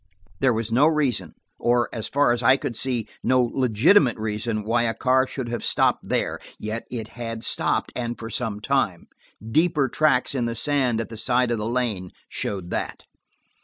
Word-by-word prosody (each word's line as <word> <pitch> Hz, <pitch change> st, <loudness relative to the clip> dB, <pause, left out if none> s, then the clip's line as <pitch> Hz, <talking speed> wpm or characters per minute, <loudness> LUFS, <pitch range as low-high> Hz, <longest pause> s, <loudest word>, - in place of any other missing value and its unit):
There 130 Hz, -, +4 dB
was 115 Hz, -1 st, -2 dB
no 135 Hz, +6 st, +5 dB
reason, 130 Hz, -, 0 dB, 0.2 s
or, 120 Hz, 0 st, +2 dB
so 110 Hz, -, -3 dB
far 140 Hz, -2 st, +3 dB
as 120 Hz, 0 st, 0 dB
I 130 Hz, +3 st, +5 dB
could 135 Hz, -4 st, -4 dB
see, 120 Hz, -2 st, -1 dB, 0.2 s
no 130 Hz, 0 st, +3 dB
legitimate 125 Hz, -, +3 dB
reason, 110 Hz, 0 st, -2 dB
why 115 Hz, +3 st, +1 dB
a 115 Hz, -1 st, 0 dB
car 130 Hz, +2 st, +2 dB
should 125 Hz, -1 st, -5 dB
have 120 Hz, -1 st, -3 dB
stopped -, -, +1 dB
there, -, -, 0 dB, 0.2 s
yet 110 Hz, +2 st, -5 dB
it 115 Hz, -3 st, -5 dB
had 115 Hz, -2 st, -6 dB
stopped -, -, 0 dB
and 120 Hz, -1 st, -3 dB
for 115 Hz, 0 st, -7 dB
some 110 Hz, -5 st, -3 dB
time. 110 Hz, -9 st, 0 dB, 0.4 s
Deeper 150 Hz, +2 st, +2 dB
tracks 130 Hz, -1 st, +2 dB
in 125 Hz, -3 st, 0 dB
the 115 Hz, 0 st, -2 dB
sand 125 Hz, -3 st, +1 dB
at -, -, -6 dB
the 115 Hz, -, -8 dB
side 125 Hz, +2 st, +1 dB
of 115 Hz, -, 0 dB
the 105 Hz, +2 st, -2 dB
lane 115 Hz, -7 st, -1 dB, 0.2 s
showed 95 Hz, -3 st, -4 dB
that. -, -, -3 dB
120 Hz, 185 wpm, -24 LUFS, 110-130 Hz, 0.4 s, no